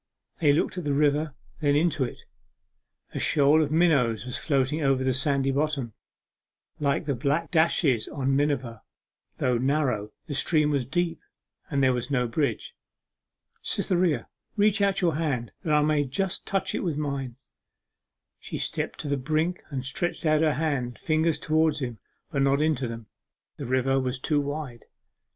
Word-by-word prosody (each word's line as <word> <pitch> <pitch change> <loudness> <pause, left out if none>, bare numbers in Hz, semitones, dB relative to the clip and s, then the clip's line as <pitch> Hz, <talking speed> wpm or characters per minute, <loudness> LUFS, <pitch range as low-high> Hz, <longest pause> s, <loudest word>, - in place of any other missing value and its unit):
They 150 -5 +4
looked 160 +5 0
at - - -6
the 145 -2 0
river, 150 0 +1 0.2
then 145 -2 +2
into 155 -2 +2
it; 125 - -5 0.9
a - - -3
shoal 150 +1 +4
of 150 - 0
minnows 140 -10 +3
was 125 0 -4
floating 140 +1 0
over 135 -2 +2
the 130 0 +1
sandy 135 +1 +1
bottom, 140 -4 -1 0.9
like 145 +2 0
the 145 - 0
black 140 +6 -1
dashes 160 -7 +2
on 135 -1 -1
miniver; 135 -5 -1 0.6
though 125 -2 +1
narrow, 130 -6 0
the 155 - -5
stream 150 +1 +2
was 135 -4 0
deep, 170 +3 -1 0.5
and 140 -2 +1
there 130 -1 +4
was 125 +2 -3
no 125 -3 +1
bridge. 115 0 -2 0.9
'Cytherea, 175 -4 0 0.3
reach 210 0 +3
out 195 -1 +2
your 170 -3 +2
hand 135 -8 -2
that 155 - -1
I 150 0 +4
may 150 -1 +2
just 185 +8 -2
touch 195 -1 0
it - - -2
with 165 -6 -1
mine.' 140 -5 -3 1.0
She - - -6
stepped - - -2
to - - -5
the 140 0 0
brink 155 +6 -1
and 135 -3 -4
stretched 175 +6 -3
out 155 0 +3
her 155 -2 +2
hand 145 -4 0
and 120 - -11
fingers 160 0 +1
towards 155 0 +1
his, 120 -3 -4 0.3
but 140 -4 0
not 140 +1 +3
into 150 -5 +1
them. 115 -1 -7 0.5
The 140 - -5
river 130 +1 +2
was 130 0 -1
too 145 +2 +1
wide. 145 -4 -5
145 Hz, 170 wpm, -26 LUFS, 130-155 Hz, 1.0 s, They